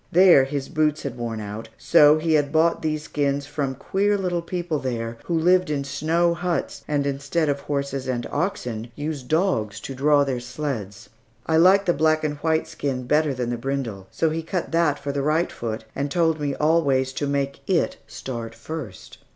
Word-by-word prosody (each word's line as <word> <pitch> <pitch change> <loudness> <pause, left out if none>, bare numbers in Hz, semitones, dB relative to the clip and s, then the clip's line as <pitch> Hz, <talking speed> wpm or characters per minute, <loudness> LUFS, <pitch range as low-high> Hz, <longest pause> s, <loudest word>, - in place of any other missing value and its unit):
There 175 -6 +7
his 135 0 -3
boots 155 -2 0
had 135 -3 -4
worn 115 -2 -4
out. 105 +2 -7
So 150 -2 +6
he 160 +1 0
had 145 -2 +2
bought 165 +2 +3
these 155 -1 -1
skins 140 -2 -1
from 140 -2 -3
queer 205 +8 0
little 180 -3 -1
people 170 -2 -3
there, 115 -3 -4
who 170 - 0
live 180 +2 +3
in 145 -2 -1
snow 160 +5 +1
huts, 175 0 -3
and 145 -2 0
instead 145 +3 -1
of 140 0 0
horses 140 -2 -3
or 125 -2 0
oxen, 120 - -3
use 150 -1 -4
dogs 125 - 0
to 135 - -6
draw 145 +2 +4
their 135 -3 -2
sleds. 120 -5 -5 0.4
I 160 - +2
liked 190 +4 +6
the 175 - +3
black 155 0 +2
and 150 -1 -1
white 160 +1 0
skin 130 -3 -3
better 150 +3 +2
than 125 -1 -2
the 120 - -2
brindle, 120 -7 -3
so 160 -1 0
he 165 +1 -2
cut 170 +2 -3
that 165 -3 +2
for 140 0 -4
the 140 0 -2
right 155 +4 +1
foot, 110 -2 -5
and 140 +1 -2
told 160 0 +1
me 145 -2 -1
always 140 -4 +2
to 145 - -2
make 140 0 -1
it 180 -3 +1
start 115 -3 -6
first. 120 - -8
145 Hz, 190 wpm, -23 LUFS, 130-160 Hz, 0.4 s, There